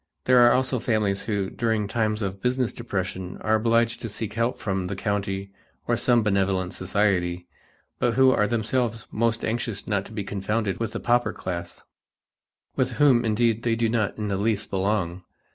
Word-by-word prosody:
There 125 -1 +6
are 120 0 +7
also 130 0 +1
the 120 - -13
families 105 -4 +1
who, 100 -3 -1
during 110 -4 0
times 110 0 0
of 95 0 -4
business 125 -1 0
depression, 95 -5 -4
are 110 - +1
obliged 115 +1 +2
to 115 - -4
seek 105 +1 -5
help 115 +2 0
from 95 -3 -2
the 100 - -4
county 100 -1 -2 0.4
or - - +2
some 120 -2 +3
benevolent 95 -3 0
society, 90 -2 0 0.5
but 120 -2 +1
who 130 0 +6
are 105 -5 +2
themselves 115 +1 -1
most 115 0 0
anxious 115 -2 -2
not 100 -2 -1
to - - -12
be 105 -2 -4
confounded 100 0 -2
with 115 -1 -3
the 115 - -3
pauper 120 0 +1
class, 85 -1 -6 0.9
with 130 -1 0
whom 130 -2 +4
indeed 115 0 +1
they 115 -1 +1
do 115 -1 +1
not 110 -3 0
in 105 -1 -3
the 100 -1 -1
least 105 0 -1
belong. 95 -2 -1
110 Hz, 180 wpm, -25 LUFS, 100-115 Hz, 0.9 s, are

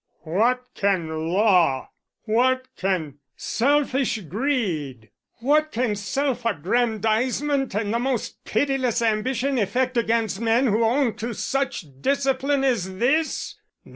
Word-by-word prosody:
"What 235 +10 +1
can 165 -5 -1
law, 180 -9 +3 0.3
what 255 +3 +2
can 165 -7 -2 0.2
selfish 270 -2 +1
greed, 170 - -2 0.3
what 305 +4 +2
can 235 -3 0
self 245 +5 -2
aggrandizement 230 - 0
and 210 0 -1
the 235 - +1
most 255 -2 -3
pitiless 255 -1 0
ambition 250 +4 0
effect 250 +4 0
against 225 -3 0
men 230 +3 +3
who 225 -1 +2
own 240 +1 +2
to 235 0 -4
such 270 -8 -2 0.2
discipline 275 0 +1
as 195 -8 0
this? 305 +9 0
235 Hz, 110 wpm, -23 LUFS, 200-265 Hz, 0.3 s, law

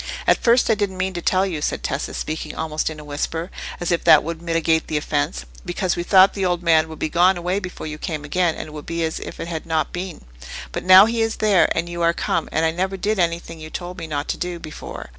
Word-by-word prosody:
"At - - +3
first 235 0 +4
I - - +6
didn't 205 -3 -2
mean 185 +1 -1
to 175 - -4
tell 185 +2 +2
you," 170 -6 -3
said - - -2
Tessa, - - -3
speaking 155 +1 -4
almost 155 -1 -2
in 155 -1 -8
a - - -9
whisper, 160 +4 -4 0.3
as 175 0 -2
if 170 - +1
that 155 - +7
would 165 +1 -5
mitigate 165 -1 +1
the 155 - -1
offence; 145 - -2 0.2
"because 175 +1 -1
we 175 - -2
thought 190 +2 +6
the 195 - -3
old 175 -1 0
man 160 -2 +4
would 160 - -8
be - - -1
gone 180 +4 +3
away 180 +3 -1
before 180 -4 -7
you 155 0 -6
came 155 -3 -4
again, 175 +2 +1
and - - -6
it - - -12
would 150 -1 -9
be 170 0 -2
as 160 0 -2
if - - -8
it - - -4
had 165 -1 -5
not 160 -1 -1
been. 180 -1 -5 0.5
But - - -4
now 185 +2 +9
he 230 +1 -1
is 225 0 0
there, 205 -4 +3
and 170 - 0
you 175 0 -5
are 170 0 +3
come, - - -1
and 160 +1 +1
I 160 - +2
never 190 +3 -2
did 205 +2 -1
anything 170 -1 -1
you 155 0 -8
told 180 +2 -6
me 165 - -6
not 145 -2 -3
to - - -1
do 180 -1 -3
before. 155 - -8
170 Hz, 265 wpm, -22 LUFS, 160-185 Hz, 0.5 s, now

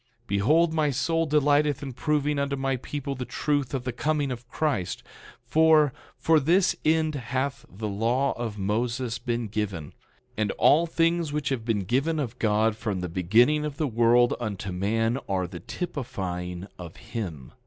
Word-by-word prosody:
11:4 - - -38
Behold, 150 - +3
my 155 -2 +2
soul 165 +4 0
delighteth 145 -1 +2
in 135 -2 -5
proving 150 +2 0
unto 140 0 -1
my 135 0 -1
people 140 +2 -5
the 130 -1 -5
truth 145 +1 -1
of 130 - -3
the 125 - -2
coming 145 +2 -1
of 125 0 -7
Christ; 125 - -2 0.4
for, 155 -3 +4 0.2
for 160 -1 +4
this 175 +6 +3
end 155 0 +2
hath 135 +1 -3
the 105 +3 -5
law 115 +7 +1
of 115 -3 -5
Moses 115 +4 -1
been 120 -2 -2
given; 100 -7 -4 0.4
and 105 -1 0
all 165 +3 +4
things 165 -1 +1
which 150 0 -1
have 130 -5 -2
been 110 -4 0
given 135 - 0
of 135 -7 -4
God 110 0 +2
from 105 -4 -3
the 90 - -3
beginning 115 - +3
of 150 -2 -4
the 160 - 0
world, 120 0 +4
unto 100 -5 -4
man, 115 +7 0
are 95 -2 0
the 85 0 -8
typifying 90 - -5
of 85 -2 -9
him. 90 - -6
125 Hz, 170 wpm, -26 LUFS, 105-150 Hz, 0.4 s, for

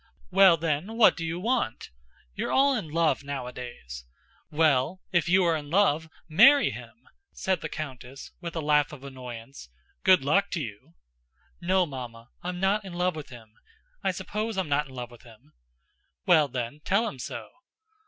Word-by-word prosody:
"Well 190 -4 +7
then, 165 +7 -2
what 230 - +6
do 165 - -5
you 165 +1 -3
want? 230 - -1 0.4
You're - - -3
all 275 0 +4
in 190 -10 -4
love 160 -1 +1
nowadays. 125 - -7 0.5
Well, 155 +1 +2
if 175 -2 +1
you 185 +1 +5
are 165 -1 +3
in 145 -2 -6
love, 160 -3 +2 0.2
marry 275 - +6
him!" - - -11 0.3
said 190 -3 -1
the - - -4
countess, 135 -3 -8
with 170 -1 -6
a 165 - -1
laugh 150 -1 +2
of 135 -3 -11
annoyance. 125 - -9 0.3
"Good 185 -6 +5
luck 200 +7 +2
to 175 - -1
you!" 105 - -8 0.7
"No, 185 +1 +2
Mamma, 120 -5 -8
I'm 180 0 -4
not 200 +3 +1
in 190 -2 -9
love 180 0 0
with 155 -2 -8
him, 115 -4 -13 0.5
I - - +2
suppose 210 +4 -3
I'm 185 -5 -1
not 145 +1 +1
in 130 - -13
love 120 -1 -6
with 120 - -15
him." 110 -10 -19 0.7
"Well 155 -4 +5
then, 125 +2 -5
tell 215 +5 +2
him 135 - -7
so." 115 -2 -6
155 Hz, 175 wpm, -27 LUFS, 130-185 Hz, 0.7 s, Well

